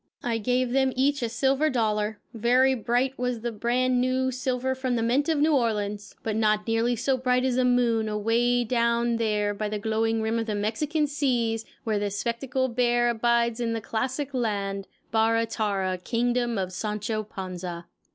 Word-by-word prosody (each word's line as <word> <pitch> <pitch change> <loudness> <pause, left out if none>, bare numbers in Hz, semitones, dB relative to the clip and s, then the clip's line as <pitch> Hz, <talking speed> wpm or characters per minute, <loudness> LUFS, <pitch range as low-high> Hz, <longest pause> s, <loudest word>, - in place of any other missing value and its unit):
I 230 -2 -1
gave 250 +2 0
them 265 0 +2
each 280 +2 +1
a 235 - -1
silver 270 +6 +2
dollar 215 -4 0
very 250 +4 +3
bright 250 +2 0
was 250 -2 -1
the 240 +1 -2
brand 245 +3 +1
new 260 +1 +1
silver 260 0 -1
from 260 -1 -2
the 230 - 0
mint 265 +7 +1
of 320 - +2
New 305 +2 +3
Orleans, 210 -5 -1
but 220 -1 -2
not 215 -1 +2
nearly 230 +1 +1
so 260 +3 0
bright 250 0 +2
as 255 -2 +1
the 255 0 +2
moon 235 -3 +2
away 230 +3 +1
down 235 0 +1
there 210 -2 0
by 210 +1 -3
the 210 - -2
glowing 220 +1 0
rim 225 +1 0
of 225 - -3
the 210 - -1
Mexican 285 +10 0
seas 240 -6 0 0.2
where 215 -2 0
the 205 0 -1
spectacled 235 +4 -2
bear 240 -1 +3
abides 235 0 +1
in 230 -1 -1
the 225 - -1
classic 260 +6 -3
land, 200 -5 -2 0.2
Barra 225 +1 +3
Tarra, 200 -5 -1
Kingdom 240 +3 0
of 185 -1 -2
Sancho 210 +2 -2
Panza. 185 -4 -6
235 Hz, 180 wpm, -26 LUFS, 215-250 Hz, 0.2 s, very